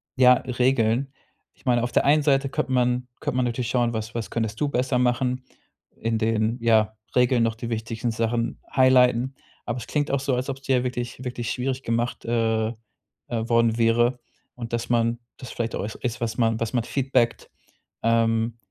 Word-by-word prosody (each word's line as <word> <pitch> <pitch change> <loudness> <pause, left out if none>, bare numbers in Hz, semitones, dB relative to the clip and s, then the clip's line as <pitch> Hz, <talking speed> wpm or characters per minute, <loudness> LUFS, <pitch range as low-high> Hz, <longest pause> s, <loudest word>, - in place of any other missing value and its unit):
ja, 125 -1 +7
Regeln. 125 0 +1 0.4
Ich - - -28
meine 120 -2 +2
auf 120 - -2
der - - +3
einen 150 +2 +5
Seite 135 -1 +2
könnte 130 - -2
man 125 0 +1
könnte 125 - -2
man 130 - +2
natürlich 120 0 -2
schauen, 120 -1 +1
was 110 0 -4
was 115 -2 -4
könntest 110 -1 -3
du 150 - +2
besser 125 -1 0
machen. 125 +1 +1 0.5
In 115 0 -1
den, 110 +1 +1
ja, 110 -2 +3 0.2
Regeln 125 -1 +4
noch 115 -1 0
die 115 +1 -6
wichtigsten 115 +1 -2
Sachen 115 +1 -1 0.2
highlighten. 130 0 +4 0.3
Aber 120 +1 -3
es 120 - -7
klingt 145 -1 -1
auch 140 - +1
so, 135 -1 0
als 125 +2 -2
ob's 135 0 -5
dir 130 -2 +2
wirklich 125 0 -4
wirklich 120 -2 -3
schwierig 130 +1 -2
gemacht, 115 +1 -2
äh, 115 -1 +1
äh, - - -5 0.6
worden 115 -1 +1
wäre 120 +2 +3 0.4
und 120 -1 -7
dass 120 - -2
man 115 0 +1 0.2
das 125 - -9
vielleicht 115 -1 -3
au - - -3
ist, 115 +3 -4
was 115 -1 -2
man 115 -2 +2
was 115 +1 -2
man 120 -2 +1
feedbackt, 125 -2 0 0.5
ähm, 115 0 +2
120 Hz, 185 wpm, -24 LUFS, 115-125 Hz, 0.6 s, ja